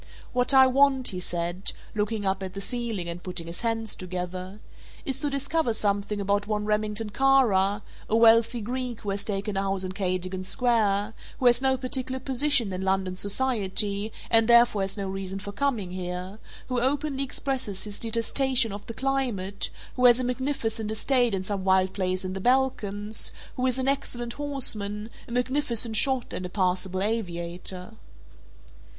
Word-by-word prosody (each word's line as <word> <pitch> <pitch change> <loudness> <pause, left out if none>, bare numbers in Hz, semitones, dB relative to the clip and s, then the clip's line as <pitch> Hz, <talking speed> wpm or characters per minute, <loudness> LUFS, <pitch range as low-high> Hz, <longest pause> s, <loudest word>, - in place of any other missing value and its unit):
"What 250 +1 +3
I 265 -1 +8
want," 265 0 +4
he 185 - -4
said, 175 +1 -2 0.2
looking 210 0 -1
up 190 0 0
at 190 0 -6
the - - -4
ceiling 225 -4 -2
and 170 +1 -5
putting 180 -2 -4
his 170 +1 -7
hands 225 -2 -1
together, 185 +2 -5 0.5
"is 270 -1 -1
to 295 - +1
discover 280 -1 0
something 205 -1 0
about 205 +1 0
one 210 -1 -1
Remington 210 0 0
Kara, 210 -7 +3 0.3
a 220 - +2
wealthy 230 +1 +5
Greek 245 +1 -4
who 205 - -3
has 200 0 -2
taken 205 0 -3
a 195 - +1
house 195 -1 -1
in 185 - -4
Cadogan 185 -1 -2
Square, 215 -2 +1 0.2
who 260 - -3
has 240 0 +6
no 265 0 +2
particular 260 0 -3
position 265 -5 +2
in 185 - -3
London 190 -1 0
society 205 -1 +1 0.2
and 225 -1 +5
therefore 235 -3 +6
has 195 +1 -1
no 200 -1 -3
reason 190 0 -4
for 200 +1 -6
coming 220 -6 -1
here, 180 +2 -5 0.3
who 250 -1 0
openly 275 +1 0
expresses 260 -7 -3
his 205 -1 -4
detestation 235 +1 +1
of 200 +1 -7
the 230 - -6
climate, 235 -8 -1 0.3
who 250 - +3
has 240 0 +6
a - - -1
magnificent 245 -4 -2
estate 240 0 +1
in 190 - -3
some 195 0 -3
wild 190 0 +3
place 185 -1 -2
in 185 - -3
the 190 - -5
Balkans, 215 -4 0 0.2
who 255 0 0
is 255 0 0
an 260 0 -1
excellent 240 -3 -2
horseman, 220 -7 -1 0.2
a - - -11
magnificent 245 -2 0
shot 260 +2 +3
and - - -3
a 180 - -4
passable 185 0 0
aviator." 180 -2 -3
215 Hz, 170 wpm, -26 LUFS, 190-250 Hz, 0.5 s, I